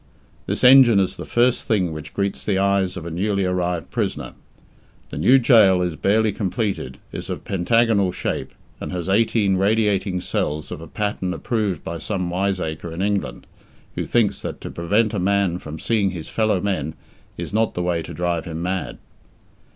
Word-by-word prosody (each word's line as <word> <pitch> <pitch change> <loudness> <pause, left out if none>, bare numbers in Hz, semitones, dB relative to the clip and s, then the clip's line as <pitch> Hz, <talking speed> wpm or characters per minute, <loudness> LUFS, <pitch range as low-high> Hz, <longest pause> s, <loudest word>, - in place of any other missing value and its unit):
This - - -2
engine 125 -4 +8
is 95 - 0
the - - -7
first 120 +1 +2
thing 95 -6 +1
which 75 -1 -9
greets 100 0 -1
the 100 -3 0
eyes 95 -1 +1
of 85 - -7
a 85 - -5
newly 100 +3 0
arrived 90 -2 -1
prisoner. - - -3 0.8
The - - -6
new 120 - +6
gaol 110 -8 +5
is 90 -3 -2
barely 110 +5 +2
completed, 100 +1 -3
is - - -7
of - - -5
pentagonal 100 +1 +2
shape, - - -3 0.3
and - - -5
has 90 -1 -4
eighteen 100 -1 +2
radiating 100 -2 +1
cells 75 -3 -3
of - - -6
a 80 - -9
pattern 100 -3 -2
approved 105 -6 -2
by 85 0 -5
some 90 -3 -3
wiseacre 90 -4 -2
in 85 +3 -3
England, 100 -12 -2 0.5
who - - -3
thinks 105 -5 +1
that - - -5
to - - -6
prevent 105 +6 +1
a 105 - -1
man 95 -1 +1
from 80 -1 -8
seeing 105 +1 +1
his 85 -4 -7
fellowmen 100 -7 0 0.4
is - - -6
not 110 +1 +1
the 90 - -1
way 85 -2 0
to - - -8
drive 85 -2 -2
him 80 -2 -5
mad. 90 +1 -3
95 Hz, 175 wpm, -22 LUFS, 90-105 Hz, 0.8 s, engine